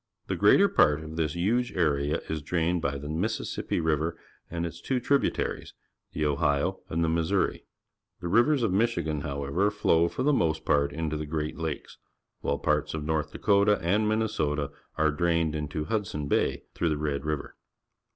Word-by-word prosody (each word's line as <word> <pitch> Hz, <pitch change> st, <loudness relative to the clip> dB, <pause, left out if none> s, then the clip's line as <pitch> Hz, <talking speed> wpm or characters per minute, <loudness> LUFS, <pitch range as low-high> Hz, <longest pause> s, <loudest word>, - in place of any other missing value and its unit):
The -, -, -2 dB
greater -, -, +6 dB
part 75 Hz, +1 st, +3 dB
of 80 Hz, 0 st, -8 dB
this 80 Hz, -3 st, 0 dB
huge 115 Hz, +8 st, +1 dB
area 75 Hz, -4 st, +1 dB
is 80 Hz, -1 st, -3 dB
drained 85 Hz, +3 st, 0 dB
by 70 Hz, -2 st, -1 dB
the 70 Hz, +1 st, -7 dB
Mississippi 90 Hz, +8 st, -2 dB
River 80 Hz, 0 st, 0 dB, 0.3 s
and 85 Hz, 0 st, -3 dB
its 85 Hz, -, -7 dB
two 130 Hz, -2 st, 0 dB
tributaries, 140 Hz, +3 st, 0 dB, 0.4 s
the 75 Hz, -, -1 dB
Ohio 70 Hz, 0 st, +1 dB
and 85 Hz, +1 st, 0 dB
the -, -, +2 dB
Missouri. 85 Hz, +4 st, 0 dB, 0.5 s
The 85 Hz, -, -4 dB
rivers 120 Hz, -, +3 dB
of 110 Hz, -, +2 dB
JVIichigan, 85 Hz, -8 st, 0 dB
however, 70 Hz, +8 st, 0 dB
flow 85 Hz, -5 st, +2 dB
for 130 Hz, -, -3 dB
the 150 Hz, +2 st, +3 dB
most 80 Hz, -, +1 dB
part 70 Hz, -1 st, +2 dB
into 80 Hz, 0 st, -2 dB
the 75 Hz, 0 st, -5 dB
Great 75 Hz, +1 st, -3 dB
Lakes, 80 Hz, -2 st, -5 dB, 0.4 s
while -, -, -1 dB
parts 75 Hz, 0 st, 0 dB
of 75 Hz, -, -4 dB
North 80 Hz, -1 st, -1 dB
Dakota 100 Hz, +1 st, +3 dB
and 105 Hz, +6 st, +1 dB
]\Iinnesota 80 Hz, -10 st, 0 dB, 0.3 s
are 80 Hz, -1 st, +3 dB
drained 80 Hz, 0 st, +1 dB
into 75 Hz, 0 st, -3 dB
Hudson 90 Hz, -7 st, -2 dB
Bay -, -, +1 dB
through 85 Hz, -, 0 dB
the 75 Hz, -, 0 dB
Red 75 Hz, -2 st, -2 dB
River. 75 Hz, -2 st, -3 dB
80 Hz, 170 wpm, -28 LUFS, 75-95 Hz, 0.5 s, greater